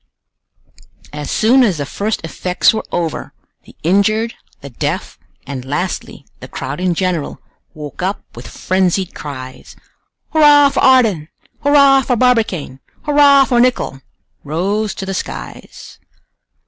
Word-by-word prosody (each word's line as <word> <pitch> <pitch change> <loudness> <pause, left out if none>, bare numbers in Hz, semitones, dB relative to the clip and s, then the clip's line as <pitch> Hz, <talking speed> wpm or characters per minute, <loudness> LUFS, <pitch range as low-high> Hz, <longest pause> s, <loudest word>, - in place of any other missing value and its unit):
As 150 -1 -6
soon 250 +5 +3
as 205 -9 +2
the 145 - -3
first 210 +9 -3
effects 180 +6 +1
were 220 - -3
over, 165 -3 -3 0.3
the - - -17
injured, 215 +6 +1 0.3
the 140 - -10
deaf, 115 - -4 0.3
and 135 -2 -6
lastly, 145 0 -4
the 130 - -10
crowd 135 +3 -6
in 180 -1 0
general, 180 -4 -2 0.4
woke 150 -1 -8
up 190 +3 -2
with - - -10
frenzied 185 0 -1
cries. 130 -3 -9 0.6
"Hurrah 295 -2 +6
for 275 - -2
Ardan! 225 -12 +3 0.3
Hurrah 280 -2 +5
for 250 -1 0
Barbicane! 220 - 0 0.2
Hurrah 285 -2 +5
for 245 -2 +1
Nicholl!" 240 - 0 0.4
rose 195 +8 -2
to 195 - -6
the 195 - -4
skies. - - -8
190 Hz, 130 wpm, -16 LUFS, 150-250 Hz, 0.6 s, Hurrah